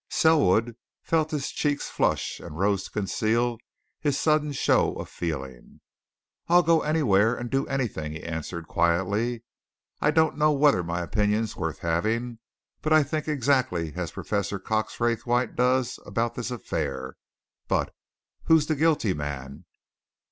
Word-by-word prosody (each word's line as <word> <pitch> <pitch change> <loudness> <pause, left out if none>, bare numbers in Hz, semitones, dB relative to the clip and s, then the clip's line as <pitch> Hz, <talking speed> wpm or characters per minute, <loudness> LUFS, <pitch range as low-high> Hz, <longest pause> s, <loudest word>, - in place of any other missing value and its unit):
Selwood 120 - +3 0.3
felt 160 -1 +1
his 150 -3 -3
cheeks 145 -1 -1
flush - - -1
and 75 - -9
rose 100 0 +1
to - - -9
conceal 110 +4 0 0.4
his 145 -3 0
sudden 150 -1 +2
show 135 - +2
of - - -6
feeling. 65 -7 -6 0.7
"I'll 175 +1 +5
go 165 -1 +4
anywhere 120 -8 +3
and 120 -1 -6
do 135 0 0
anything!" 110 - -2
he 80 - -8
answered 85 0 -5
quietly. 100 +9 0 0.6
"I 150 - +2
don't 160 -1 +2
know 150 0 +4
whether 140 -8 +4
my 85 0 -3
opinion's 105 +3 0
worth 80 -4 -3
having, 110 +8 -1 0.4
but 155 - +1
I 155 -1 +6
think 155 +2 -3
exactly 130 - +1
as 90 -1 -3
Professor 100 -1 -2
Cox 110 +3 -2
Raythwaite 120 +1 0
does 125 0 +1
about 115 +3 -1
this 120 0 -4
affair. 75 - -4 0.5
But - - 0 0.5
who's 160 -2 +5
the 155 - 0
guilty 150 - +2
man? 70 +1 -6
115 Hz, 140 wpm, -26 LUFS, 90-145 Hz, 0.7 s, I